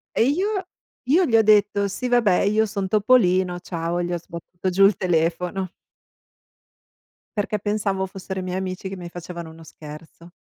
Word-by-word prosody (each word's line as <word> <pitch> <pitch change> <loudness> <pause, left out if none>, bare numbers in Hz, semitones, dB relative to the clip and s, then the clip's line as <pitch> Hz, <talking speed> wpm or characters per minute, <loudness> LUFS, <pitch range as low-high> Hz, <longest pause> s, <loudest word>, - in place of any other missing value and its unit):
E - - +4
io 380 - 0 0.4
io 320 +9 +3
gli 235 - +1
ho - - +6
detto: 205 -1 +3
"Sì, 200 +6 -4
vabbè, 225 -7 +3
io 215 +2 +2
son 200 -2 -3
Topolino, 190 -4 +3
ciao" 170 -1 -3
e 175 - -1
gli 175 - -3
ho - - 0
sbattuto 170 +2 -6
giù 195 +2 +5
il 200 0 +4
telefono. 175 +2 0 1.7
Perché 210 +1 -1
pensavo 200 -2 -1
fossero 190 0 -6
i - - -6
miei 180 0 -3
amici, 190 0 -4
che 195 - -7
mi 175 -1 -7
facevano 170 -1 -8
uno 165 0 -14
scherzo. 160 +2 -12
190 Hz, 170 wpm, -23 LUFS, 175-210 Hz, 1.7 s, ho